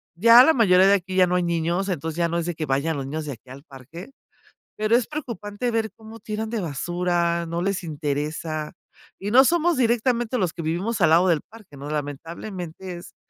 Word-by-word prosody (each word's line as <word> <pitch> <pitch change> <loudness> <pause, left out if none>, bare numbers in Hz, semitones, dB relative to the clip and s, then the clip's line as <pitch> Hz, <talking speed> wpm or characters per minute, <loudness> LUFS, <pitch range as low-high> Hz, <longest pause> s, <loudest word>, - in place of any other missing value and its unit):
Ya 230 +6 +8
la 320 - +5
mayoría 190 -5 +5
de 200 - +5
aquí, 185 0 -4
ya 185 -1 +5
no 180 - 0
hay 180 - +1
niños, 170 +3 -1
entonces, 160 -1 -3
ya 170 -1 +2
no 170 - -1
es 170 - -2
de 175 -2 -3
que 155 - -3
vayan 140 +3 0
los 135 - -4
niños 155 +2 -4
de 140 - -4
aquí 125 +2 -17
al 135 +2 -11
parque. 160 - -12 0.7
Pero, 215 +2 +2
es 245 - 0
preocupante 240 -6 -4
ver 225 -1 -1
cómo 220 +1 -12
tiran 215 +1 -4
de 230 -3 -2
basura, 170 +1 -1
no 170 +1 -3
les 195 -2 -2
interesa, 150 +1 -3 0.5
y 205 +1 -4
no 265 +2 +7
somos 345 -1 +2
directamente 240 0 +1
los 180 -4 0
que 170 - -7
vivimos 185 +8 -2
al 160 -2 +4
lado 175 +3 +5
del 165 -3 +2
parque, 210 -9 -16
¿no? 145 +2 -7
Lamentablemente, 170 +4 -6
es - - -13
175 Hz, 210 wpm, -23 LUFS, 160-220 Hz, 0.7 s, Ya